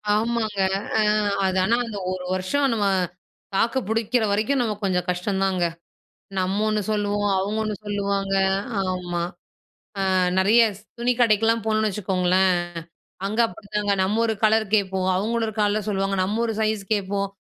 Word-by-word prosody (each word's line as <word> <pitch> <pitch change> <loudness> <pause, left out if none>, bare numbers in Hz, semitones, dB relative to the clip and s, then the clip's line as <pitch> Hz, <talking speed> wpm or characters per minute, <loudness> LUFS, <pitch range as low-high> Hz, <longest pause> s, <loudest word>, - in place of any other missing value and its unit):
ஆமாங்க. 220 -2 -1 0.4
அ, - - +4 0.4
அது 190 0 0
ஆனா, 230 +5 +3
அந்த 215 -3 -6
ஒரு 185 -1 -4
வருஷம் 230 +10 +1
நம்ம 210 -2 0 0.7
தாக்கு 230 +6 +2
புடிக்கிறவரைக்கும் 225 +2 +1
நமக்கு 210 -3 -3
கொஞ்சம் 180 -2 0
கஷ்டம்தாங்க. 190 0 0 0.8
நம்ம 185 +2 0
ஒண்ணு 215 0 0
சொல்லுவோம், 205 0 0
அவுங்க 205 +3 -1
ஒண்ணு 215 -1 -2
சொல்லுவாங்க. 200 -1 -1 0.6
ஆமா. 175 -1 -3 0.9
ஆ, - - +2 0.3
நெறைய 215 +5 +5 0.2
ஸ் - - -19 0.2
துணி 240 +1 +2
கடைக்கெல்லாம் 225 0 +3
போனோன்னு 215 0 +1
வச்சுக்கோங்களேன், 185 -1 +2 0.7
அங்க 215 +3 -3
அப்பிடிதாங்க. 205 +1 -3
நம்ம 210 +4 +1
ஒரு 220 - 0
கலர் 220 0 +4
கேட்போம். 190 -2 +1
அவுங்க 220 +5 -1
ஒரு 220 -1 -1
கலரு 210 +1 +2
சொல்லுவாங்க. 195 -1 0
நம்ம 205 +4 -2
ஒரு 225 - -2
சைஸ் 215 -1 0
கேட்போம். 200 -1 -1
205 Hz, 140 wpm, -23 LUFS, 190-220 Hz, 0.9 s, நெறைய